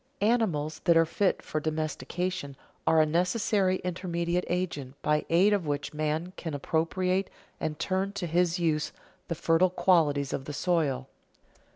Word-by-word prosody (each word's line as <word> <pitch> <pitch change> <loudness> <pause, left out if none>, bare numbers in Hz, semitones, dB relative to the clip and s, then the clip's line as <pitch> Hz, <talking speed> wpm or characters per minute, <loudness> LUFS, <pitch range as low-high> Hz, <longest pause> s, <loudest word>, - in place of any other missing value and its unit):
Animals 200 -9 +1
that 170 -1 +5
are 165 - +5
fit 190 +4 0
for 155 - -2
domestication 155 0 -3 0.3
are 160 -1 +5
a - - +4
necessary 185 +4 +1
intermediate 175 -1 -1
agent 145 -7 -3
by 150 0 +1
aid 185 +5 +5
of 190 -6 0
which 145 0 -2
man 155 +4 -2
can 160 -4 -4
appropriate 180 +6 0 0.3
and 150 -1 -2
turn 190 +3 -1
to 200 -3 -3
his 175 +1 +1
use 160 -3 0 0.3
the 170 - -2
fertile 165 +3 +3
qualities 150 -7 +2
of 135 - -3
the 150 - -5
soil. 145 -6 0
170 Hz, 150 wpm, -28 LUFS, 150-185 Hz, 0.3 s, that